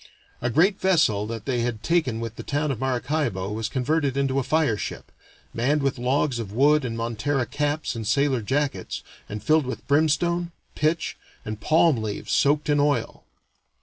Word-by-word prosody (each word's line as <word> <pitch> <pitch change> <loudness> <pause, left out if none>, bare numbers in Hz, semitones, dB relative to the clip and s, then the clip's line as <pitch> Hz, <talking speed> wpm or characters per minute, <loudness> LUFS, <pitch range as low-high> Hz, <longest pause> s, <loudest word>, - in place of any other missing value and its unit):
A 120 - 0
great 180 - +3
vessel 155 - +3
that 115 -1 -6
they 130 -3 0
had 115 -2 -2
taken 155 -10 +1
with 115 -1 -5
the - - -7
town 145 +1 -1
of 125 - -4
Maracaibo 130 -6 -1
was 110 +1 -3
converted 140 +2 0
into 135 -1 +1
a - - -1
fire 150 -4 +2
ship, - - -6 0.4
manned 140 +5 +1
with 135 -2 0
logs 130 +1 +1
of 105 -4 -5
wood 145 +6 +4
in 115 -3 -3
montera 120 +4 -1
caps 145 +1 -2
and 110 -2 -4
sailor 135 +1 +2
jackets, 140 +6 -2 0.3
and 105 0 -6
filled 155 -3 +3
with 130 - -5
brimstone, 165 +4 +2 0.2
pitch, 155 +2 0 0.3
and 110 0 -5
palm 160 -1 +4
leaves 110 -2 -4
soaked 145 +1 +2
in 145 -1 +3
oil. 145 0 0
135 Hz, 175 wpm, -24 LUFS, 115-150 Hz, 0.4 s, wood